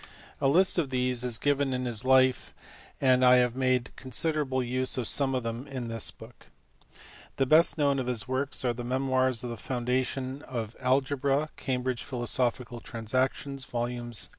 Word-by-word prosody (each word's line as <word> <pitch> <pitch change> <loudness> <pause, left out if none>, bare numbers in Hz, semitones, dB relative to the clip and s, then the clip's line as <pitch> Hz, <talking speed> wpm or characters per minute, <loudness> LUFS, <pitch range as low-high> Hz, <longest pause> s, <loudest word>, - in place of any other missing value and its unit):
A 135 - +3
list 180 +6 +4
of 150 -5 -1
these 125 -1 0
is 120 -3 0
given 140 0 0
in 125 0 -3
his 120 -1 -1
life, 130 0 +3 0.4
and 130 -1 +3
I 125 0 +7
have 125 -1 +2
made 130 -1 0
considerable 135 0 -1
use 130 +2 -1
of 120 -3 -1
some 135 -2 +3
of 125 - -2
them 115 +4 -5
in 130 -4 -5
this 115 -1 0
book. - - -14 0.9
The 135 - +1
best 155 +6 +5
known 140 -2 +2
of 130 - -3
his 115 -4 0
works 130 +1 0
are 120 - +1
the 120 +1 -6
memoirs 130 -1 +1
on 120 - -4
the 115 - -6
founda 125 +1 -1
tion 130 +1 -5
of 115 -3 -5
algebra, 135 +3 +1
Cambridge 125 -1 -2
Philosophical 120 -1 -2
Transactions, 130 +4 -3
vols. 120 -2 -3
130 Hz, 170 wpm, -28 LUFS, 120-135 Hz, 0.9 s, I